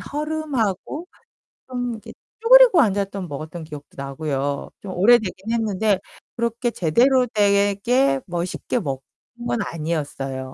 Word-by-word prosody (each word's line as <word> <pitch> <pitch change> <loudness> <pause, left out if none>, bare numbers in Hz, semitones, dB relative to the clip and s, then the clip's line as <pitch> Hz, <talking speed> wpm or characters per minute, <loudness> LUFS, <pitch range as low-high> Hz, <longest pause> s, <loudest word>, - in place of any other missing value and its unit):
허름하고 295 - -3 0.6
좀 245 -1 -3
이렇게 220 0 -10 0.3
쭈그리고 475 -7 +8
앉았던 195 -3 -1
먹었던 155 +3 -7
기억도 150 -2 -10
나고요. 140 0 -3
좀 190 -2 -6
오래되긴 215 0 +3
했는데 215 -3 +1 0.4
그렇게 235 +1 -1
제대로 250 - +3
되게 205 +6 +2
뭐 175 -1 -2
쉽게 240 +6 -3
먹은 135 -7 -4 0.5
건 240 -1 0
아니었어요. 145 -6 -4
200 Hz, 290 characters per minute, -22 LUFS, 160-245 Hz, 0.6 s, 쭈그리고